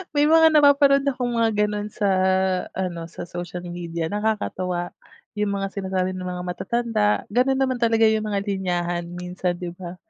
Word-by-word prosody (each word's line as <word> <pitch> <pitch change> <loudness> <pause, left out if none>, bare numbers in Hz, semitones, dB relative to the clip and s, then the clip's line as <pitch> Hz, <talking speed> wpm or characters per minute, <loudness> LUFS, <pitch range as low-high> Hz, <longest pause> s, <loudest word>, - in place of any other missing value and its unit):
May 290 0 +4
mga 320 0 +6
napapanood 285 -1 +5
akong 250 -3 -1
mga 225 -1 +3
ganun 210 0 -3
sa 200 0 0 0.7
ano, 175 -3 -3
sa 170 - -8
social 175 0 -6
media 170 -2 -4
nakakatuwa 185 -4 -2 0.5
yung 205 -1 0
mga 195 0 -2
sinasabi 190 -2 -2
ng 185 0 -6
mga 180 0 -4
matatanda, 220 +4 -1 0.2
ganun 255 +4 +2
naman 260 -2 0
talaga 225 -1 +3
yung 220 0 0
mga 200 -1 -1
linyahan 175 -3 -2
minsan 180 0 -3
'di 175 -1 -5
ba? 180 -1 -7
200 Hz, 160 wpm, -23 LUFS, 180-230 Hz, 0.7 s, mga